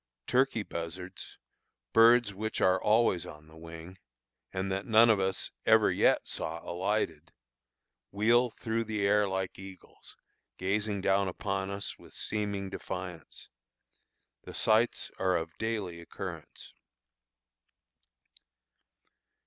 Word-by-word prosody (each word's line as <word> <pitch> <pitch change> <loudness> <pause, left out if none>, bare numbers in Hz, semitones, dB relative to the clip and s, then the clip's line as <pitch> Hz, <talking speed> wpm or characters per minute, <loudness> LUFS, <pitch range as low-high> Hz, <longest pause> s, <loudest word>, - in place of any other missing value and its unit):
Turkey 130 -3 +2
buzzards, 90 +2 -7 0.6
birds 115 -1 +6
which 110 +3 -3
are 95 0 +3
always 105 -5 +3
on 75 0 -12
the 80 - -16
wing, 85 +3 -10 0.5
and 95 +1 -2
that 95 +1 -3
none 115 0 +7
of 105 - +2
us 95 0 -2
ever - - +5
yet - - +3
saw 80 +1 -3
alighted, 85 -4 -2 0.8
wheel 120 +4 +3
through 115 0 -2
the 105 -2 -2
air 105 0 +3
like 95 -1 -3
eagles, 95 -1 -12 0.4
gazing 100 +1 -1
down 95 0 +2
upon 95 +1 -3
us 100 0 -5
with - - -15
seeming 100 -2 -2
defiance. 90 -4 -7 0.9
The - - -10
sights 110 +2 +2
are 95 -1 +2
of 80 -1 -5
daily 105 -7 -3
occurrence. 85 - -8
95 Hz, 115 wpm, -30 LUFS, 90-110 Hz, 0.9 s, none